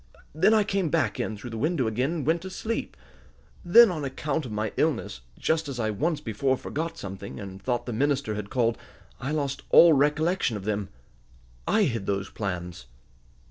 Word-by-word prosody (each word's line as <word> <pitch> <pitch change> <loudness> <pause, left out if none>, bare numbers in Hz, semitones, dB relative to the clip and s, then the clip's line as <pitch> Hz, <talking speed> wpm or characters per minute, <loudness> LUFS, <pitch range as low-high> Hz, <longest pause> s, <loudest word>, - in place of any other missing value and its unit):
Then 175 +8 +4
I 220 -1 +5
came 195 -4 0
back 135 -10 0
in 110 - -2
through 120 +4 -8
the 115 - -5
window 155 -1 +1
again, 125 +6 0
and 160 -6 -3
went 165 +2 +2
to 190 - -7
sleep. 225 +4 -4 0.7
Then, 220 +4 +7
on 155 -4 -4
account 140 +1 -2
of - - -8
my 105 0 -2
illness, 135 - -1 0.2
just 160 -2 0
as 130 -3 -5
I 110 -2 0
once 155 - -1
before 130 +4 0
forgot 160 +5 -4
something, 100 0 -7
and 95 -1 -8
thought 120 -2 -1
the 120 - -4
minister 140 -1 0
had 105 -1 -5
called, 115 -2 +1 0.4
I 130 - -4
lost 145 -3 -2
all 170 -1 +8
recollection 150 - +2
of 95 - -9
them. 105 -2 -2 0.8
I 220 - +3
hid 115 - -1
those 100 -1 -2
plans." 90 - -5
130 Hz, 185 wpm, -26 LUFS, 110-160 Hz, 0.8 s, all